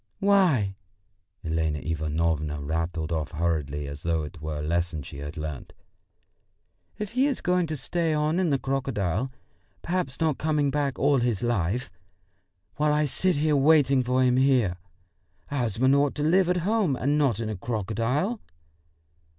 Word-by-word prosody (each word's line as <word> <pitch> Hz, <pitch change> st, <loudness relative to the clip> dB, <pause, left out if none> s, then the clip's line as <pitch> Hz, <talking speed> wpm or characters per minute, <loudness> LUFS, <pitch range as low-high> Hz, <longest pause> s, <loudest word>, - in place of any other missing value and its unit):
"Why," 185 Hz, -, +3 dB, 0.7 s
Elena 80 Hz, -2 st, -1 dB
Ivanovna 80 Hz, 0 st, -1 dB
rattled 80 Hz, +2 st, -2 dB
off 80 Hz, -3 st, -1 dB
hurriedly, 75 Hz, -3 st, -1 dB
as 70 Hz, +1 st, -7 dB
though 80 Hz, -2 st, 0 dB
it 75 Hz, +2 st, -9 dB
were 80 Hz, -1 st, -4 dB
a 75 Hz, -, -4 dB
lesson 85 Hz, -1 st, -1 dB
she 70 Hz, -, -9 dB
had 75 Hz, +3 st, -7 dB
learnt, 75 Hz, -3 st, -6 dB, 1.2 s
"if 210 Hz, -1 st, -4 dB
he 255 Hz, +4 st, +2 dB
is 275 Hz, -, -1 dB
going 180 Hz, -1 st, +1 dB
to 155 Hz, -1 st, -3 dB
stay 165 Hz, +4 st, -1 dB
on 155 Hz, +3 st, +1 dB
in 185 Hz, -3 st, +2 dB
the 140 Hz, -, +2 dB
crocodile, 130 Hz, -5 st, -1 dB, 0.5 s
perhaps 170 Hz, -7 st, -2 dB
not 160 Hz, -4 st, +1 dB
come 150 Hz, -2 st, +1 dB
back 140 Hz, -2 st, -1 dB
all 140 Hz, -1 st, +3 dB
his 120 Hz, -3 st, 0 dB
life, 115 Hz, -2 st, -1 dB, 0.9 s
while 150 Hz, +1 st, +2 dB
I 150 Hz, 0 st, +2 dB
sit 180 Hz, +4 st, +1 dB, 0.2 s
waiting 140 Hz, -2 st, +4 dB
for 125 Hz, +1 st, +1 dB
him 125 Hz, 0 st, +3 dB
here! 130 Hz, -9 st, +3 dB, 0.7 s
A 140 Hz, -, -2 dB
husband 120 Hz, +3 st, +2 dB
ought 140 Hz, 0 st, +2 dB
to 150 Hz, -, -2 dB
live 180 Hz, +3 st, +3 dB
at 180 Hz, -, +2 dB
home, 205 Hz, -9 st, +2 dB
and 145 Hz, +4 st, +1 dB
not 130 Hz, -8 st, +2 dB
in 115 Hz, -, -2 dB
a 110 Hz, -, -3 dB
crocodile...." 115 Hz, -, -1 dB
125 Hz, 160 wpm, -26 LUFS, -, 1.2 s, waiting